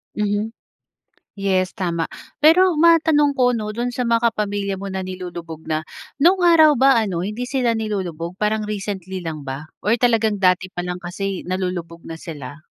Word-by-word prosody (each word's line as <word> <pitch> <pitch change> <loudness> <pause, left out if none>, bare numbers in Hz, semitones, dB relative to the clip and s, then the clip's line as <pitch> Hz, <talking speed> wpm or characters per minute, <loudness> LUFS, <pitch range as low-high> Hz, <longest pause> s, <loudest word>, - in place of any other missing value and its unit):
Mhm. 210 +2 -1 0.9
Yes 185 -1 +1
tama. 170 -3 -2 0.4
Pero 355 +2 +6
matanong 315 -3 +4
ko 250 -3 +2
'no, 215 -1 -4
do'n 240 +3 -2
sa 250 - 0
mga 235 0 +3
pamilya 200 -2 -2
mo 195 0 -6
na 190 - -2
nilulubog 175 -4 -7
na. 155 -1 -1 0.4
No'ng 360 +3 +4
araw 315 -4 +6
ba 265 -1 +5
ano 185 -5 -2
hindi 235 +5 -4
sila 255 -4 +1
nilulubog 185 -6 -3
parang 210 +1 -1
recently 190 -3 -4
lang 155 -2 -4
ba? 135 +2 -6 0.2
Or 215 +4 +2
talagang 225 -3 +2
dati 185 -1 +2
pa 175 -1 -5
lang 180 0 -4
kasi 190 +2 -4
nalulubog 180 -3 -4
na 165 0 -8
sila? 150 -2 -8
200 Hz, 165 wpm, -21 LUFS, 180-235 Hz, 0.9 s, Pero